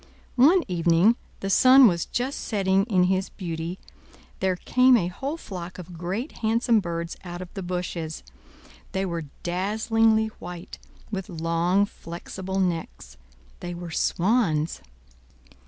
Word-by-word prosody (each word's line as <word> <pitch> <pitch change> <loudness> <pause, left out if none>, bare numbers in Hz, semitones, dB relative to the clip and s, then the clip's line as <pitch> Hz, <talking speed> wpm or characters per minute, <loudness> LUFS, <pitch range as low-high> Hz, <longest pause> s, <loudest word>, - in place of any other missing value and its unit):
One 340 +6 +6
evening—the 180 +4 +1
sun 260 +5 +8
was 170 -4 +1
just 255 +3 -2
setting 195 -2 +1
in 190 -5 +2
his 190 +1 +1
beauty—there 180 +1 -5
came 255 +6 +4
a 175 -5 0
whole 275 - -4
flock 180 - -8
of 180 -1 -9
great, 190 - -4
handsome 230 0 +2
birds 170 -2 -4
out 175 -1 -7
of 180 -1 -9
the 195 - -5
bushes; 175 -3 -4 0.7
they 190 0 0
were 170 -3 -3 0.2
dazzlingly 220 +4 +2
white, 175 0 -8 0.3
with 195 -3 -4
long, 170 +3 +1
flexible 190 +1 -6
necks; 165 - -3 0.4
they 175 0 -5
were 170 -1 -7
swans. 170 -5 +1
185 Hz, 120 wpm, -25 LUFS, 170-220 Hz, 0.7 s, sun